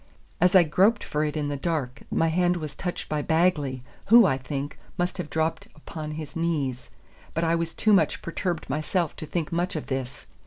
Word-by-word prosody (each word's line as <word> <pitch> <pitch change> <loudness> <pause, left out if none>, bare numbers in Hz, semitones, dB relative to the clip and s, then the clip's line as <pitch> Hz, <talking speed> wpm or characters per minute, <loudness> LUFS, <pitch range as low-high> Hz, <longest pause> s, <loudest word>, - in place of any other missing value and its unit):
As 180 +2 +4
I 185 - +9
groped 195 +8 +3
for 150 +1 -1
it 150 0 -2
in 145 -1 -1
the 145 - -2
dark 140 -4 -2
my 165 - +2
hand 175 +2 +2
was 155 -3 -5
clutched 180 -1 -4
by 150 -1 -1
Bagley, 150 -6 +1 0.2
who, 230 +1 +8
I 135 - +3
think, 135 +2 -5 0.2
must 180 +1 -1
have 170 - -4
dropped 160 0 -1
upon 155 0 -7
his 155 -2 -7
knees; 145 -7 -1 0.5
but 165 - 0
I 165 0 +2
was 165 -1 -1
too 215 - +3
much 195 - +2
perturbed 170 0 -3
myself 155 +4 -1
to 155 - -6
think 165 -1 -2
much 175 +1 -1
of 155 - -3
this. 130 -2 -4
160 Hz, 200 wpm, -26 LUFS, 145-175 Hz, 0.5 s, I